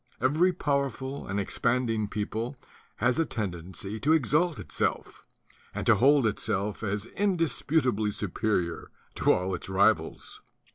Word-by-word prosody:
Every 160 +8 +3
powerful 140 -4 -2
and 100 +1 -1
expand 120 +5 0
ing 110 -2 -1
people 110 +5 -3 0.4
has 125 +4 +1
a 165 - +3
tendency 95 -2 -5
to 150 +6 +3
exalt 155 +2 +2
itself, - - -3 0.5
and - - -3
to 120 - +6
hold 135 +5 +4
itself 100 -1 -1
as 105 -1 -2
indisputably 155 - +1
superior 100 -3 -2 0.3
to - - +4
all 90 +1 0
its 90 - -5
rivals. 95 -3 +1
115 Hz, 130 wpm, -28 LUFS, 100-140 Hz, 0.5 s, to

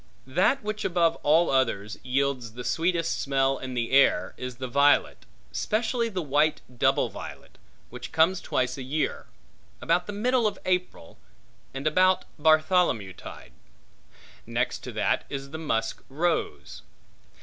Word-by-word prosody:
That 180 - +1
which 215 0 -3
above 170 -2 +2
all 160 +4 +3
others 115 -6 0
yields 130 -3 -1
the 125 +1 -7
sweetest 165 +3 0
smell 135 -1 +1
in 130 -1 -6
the 115 -1 -2
air 135 -9 +4
is 125 -1 -6
the 130 +1 -5
violet, 140 +3 +2 0.2
specially 230 - -1
the 185 -5 -3
white 150 +2 +2 0.2
double - - +2
violet, - - -10 0.3
which 125 +1 -8
comes 165 +4 +3
twice 125 +1 -1
a - - -5
year; 145 +4 -2 0.5
about 175 +2 +1
the - - -4
middle 240 +2 +2
of 210 - -3
April, 180 - -2 0.5
and 135 +2 -6
about 185 +4 +3
Bartholomew 155 - +3
tide. 65 - -11 1.0
Next - - -1
to - - -5
that - - 0
is 140 0 -6
the 160 - -6
musk 115 -8 -2
rose. 155 - -2
145 Hz, 140 wpm, -26 LUFS, 130-180 Hz, 1.0 s, air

